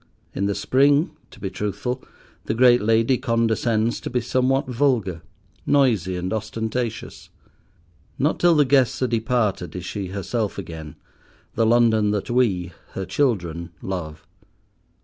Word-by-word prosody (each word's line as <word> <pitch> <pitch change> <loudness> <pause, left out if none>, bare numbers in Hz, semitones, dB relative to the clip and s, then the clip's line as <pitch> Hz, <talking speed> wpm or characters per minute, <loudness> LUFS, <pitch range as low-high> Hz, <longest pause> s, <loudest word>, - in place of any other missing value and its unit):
In 100 - -1
the 100 - -1
spring, 145 +5 +3 0.2
to - - -16
be 95 - -4
truthful, 125 +6 -3 0.4
the 110 - -1
great 120 0 +5
lady 115 +4 +2
condescends 115 0 +1
to - - -5
be 125 - 0
somewhat 130 +3 +1
vulgar—noisy 115 - 0
and 90 +3 -3
ostentatious. 110 +1 -4 0.9
Not 150 +4 +1
till 175 -1 +5
the 150 -1 +4
guests 130 -2 +2
are - - +2
departed 110 -6 -1
is 90 -1 -5
she 100 +1 -4
herself 100 +3 -3
again, 80 -5 -7 0.6
the 115 -1 +2
London 115 -2 +4
that 105 +2 -2
we, 95 -8 +1 0.2
her 95 - -4
children, 85 - -1
love. 80 -5 -6
115 Hz, 130 wpm, -23 LUFS, 95-125 Hz, 0.9 s, great